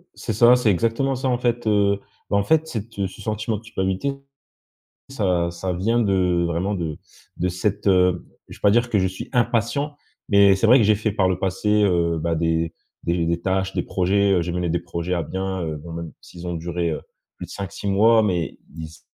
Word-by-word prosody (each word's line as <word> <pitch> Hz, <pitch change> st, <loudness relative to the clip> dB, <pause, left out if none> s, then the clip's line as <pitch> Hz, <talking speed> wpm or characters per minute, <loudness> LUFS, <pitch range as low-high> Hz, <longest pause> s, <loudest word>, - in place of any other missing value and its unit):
C'est -, -, -4 dB
ça, 120 Hz, +4 st, +6 dB
c'est 125 Hz, -4 st, +2 dB
exactement 115 Hz, +8 st, 0 dB
ça. 130 Hz, +1 st, -2 dB
En 125 Hz, -, +1 dB
fait, 120 Hz, -1 st, -1 dB
heu, 100 Hz, -1 st, +3 dB, 0.3 s
bah, 100 Hz, -, +2 dB
en 100 Hz, -, +2 dB
fait, 160 Hz, +7 st, +2 dB
cette, 115 Hz, -6 st, -6 dB
heu 100 Hz, -1 st, 0 dB
ce 95 Hz, -, -13 dB
sentiment 110 Hz, +1 st, -2 dB
de -, -, -11 dB
culpabilité, 95 Hz, +4 st, -2 dB, 1.0 s
ça 90 Hz, -9 st, 0 dB
ça 90 Hz, +2 st, -4 dB
vient 110 Hz, +7 st, +1 dB
de 90 Hz, -5 st, +2 dB
vraiment 85 Hz, +5 st, -1 dB
de 80 Hz, -5 st, -4 dB, 0.4 s
de 90 Hz, -, -1 dB
cette, 95 Hz, +4 st, -2 dB
heu 90 Hz, -2 st, +3 dB, 0.2 s
je -, -, -11 dB
vais -, -, -32 dB
pas 105 Hz, -, +5 dB
dire 120 Hz, +3 st, +2 dB
que 110 Hz, -, +1 dB
je 95 Hz, -, +1 dB
suis 95 Hz, -, -8 dB
impatient, 125 Hz, +4 st, 0 dB, 0.3 s
mais 100 Hz, -1 st, +6 dB
c'est 95 Hz, -, +2 dB
vrai 125 Hz, +3 st, +8 dB
que 110 Hz, -, +3 dB
j'ai 110 Hz, -, +4 dB
fait 110 Hz, +1 st, -1 dB
par 95 Hz, -3 st, +2 dB
le 90 Hz, -, 0 dB
passé, 105 Hz, +3 st, +1 dB
heu, 85 Hz, -3 st, +1 dB
bah, 85 Hz, +1 st, -1 dB
des 80 Hz, 0 st, 0 dB, 0.3 s
des 85 Hz, -1 st, 0 dB
des 85 Hz, 0 st, 0 dB
tâches, 95 Hz, +1 st, -1 dB
des -, -, 0 dB
projets. 100 Hz, +2 st, +1 dB
Heu, 90 Hz, -, +2 dB
j'ai 85 Hz, +1 st, -3 dB
mené 90 Hz, 0 st, -1 dB
des 85 Hz, -, +1 dB
projets 85 Hz, +1 st, -4 dB
à 85 Hz, -, -1 dB
bien, 95 Hz, +2 st, -3 dB
heu 80 Hz, -1 st, -3 dB
bon, 85 Hz, +3 st, -10 dB
même 85 Hz, -1 st, -6 dB
s'ils 90 Hz, 0 st, -11 dB
ont 85 Hz, -, -3 dB
duré, 85 Hz, 0 st, -2 dB
heu, -, -, -4 dB, 0.4 s
plus -, -, -7 dB
de -, -, -16 dB
5-6 100 Hz, 0 st, -5 dB
mois, 110 Hz, +3 st, +5 dB
mais 90 Hz, -6 st, -1 dB, 0.2 s
ils 80 Hz, -, -6 dB
s 80 Hz, +1 st, -16 dB
95 Hz, 225 wpm, -22 LUFS, 85-110 Hz, 1.0 s, vrai